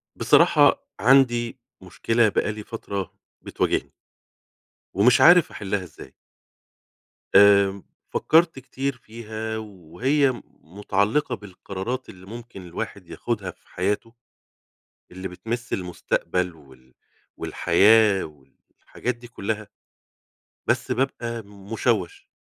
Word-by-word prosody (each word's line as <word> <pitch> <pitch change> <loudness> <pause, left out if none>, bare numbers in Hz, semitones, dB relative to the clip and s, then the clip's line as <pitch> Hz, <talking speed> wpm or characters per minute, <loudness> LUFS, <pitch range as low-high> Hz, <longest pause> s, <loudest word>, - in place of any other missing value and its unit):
بصراحة - - +4
عندي 120 0 +3 0.2
مشكلة 115 +5 +1
بقالي 105 +1 -2
فترة 100 -5 -5 0.3
بتواجهني. - - -1 1.0
ومش 110 +6 +4
عارف 175 0 +7
أحلها 100 -1 -3
إزاي. 85 -4 -13 1.2
آآ 100 -1 +6 0.3
فكرت 165 -3 +3
كتير 135 +1 -4
فيها 110 -1 -6
وهي 110 - -1 0.2
متعلقة 105 - -1
بالقرارات 105 +4 -6
اللي 95 0 -13
ممكن 115 -1 -10
الواحد 85 - -7
ياخدها - - -3
في - - -31
حياته. 105 +5 -2 1.0
اللي 95 +1 -6
بتمس 115 +7 -5
المستقبل 90 -1 -2
وال 65 -4 -20 0.4
والحياة 105 +3 +4
والحاجات 75 - -8
دي 120 0 -13
كلّها. 110 -2 -4 1.0
بس 125 +1 0
بابقى 120 -2 -2
مشوش 100 -1 -3
105 Hz, 90 wpm, -24 LUFS, 95-120 Hz, 1.2 s, عارف